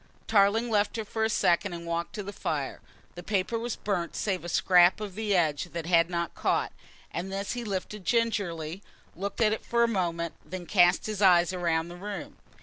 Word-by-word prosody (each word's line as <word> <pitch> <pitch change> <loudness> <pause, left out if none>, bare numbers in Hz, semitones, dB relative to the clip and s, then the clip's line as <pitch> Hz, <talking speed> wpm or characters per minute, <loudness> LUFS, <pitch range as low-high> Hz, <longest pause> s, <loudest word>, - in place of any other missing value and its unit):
Tarling 220 +3 +3
left 210 +1 +1
her 220 - -3
for 220 +1 -2
a 220 - +2
second 180 -2 +2
and 170 0 -7
walked 170 0 -3
to 210 - -4
the 200 +1 -7
fire. 145 -7 -3 0.3
The 175 - -8
paper 200 +4 -1
was 235 0 -3
burnt 180 -5 -2
save 190 -4 -1
a 175 - -5
scrap 180 +2 +5
of 210 -3 -5
the 210 0 0
edge 155 -4 +1
that 170 -1 -4
had 170 -1 +4
not 170 -2 -2
caught, - - 0 0.4
and 185 +3 -4
this 195 +1 -3
he 245 -1 -3
lifted 205 -1 -4
gingerly, 190 -7 -1 0.3
looked 200 +6 -4
at 215 -1 +4
it 220 - -4
for 235 0 +2
a - - +4
moment, 170 -6 -1
then 185 -1 -7
cast 175 -1 +4
his 215 -2 -3
eyes 180 -2 +5
round 170 -2 0
the 175 - -9
room. 200 +2 -7
190 Hz, 205 wpm, -28 LUFS, 170-210 Hz, 0.4 s, scrap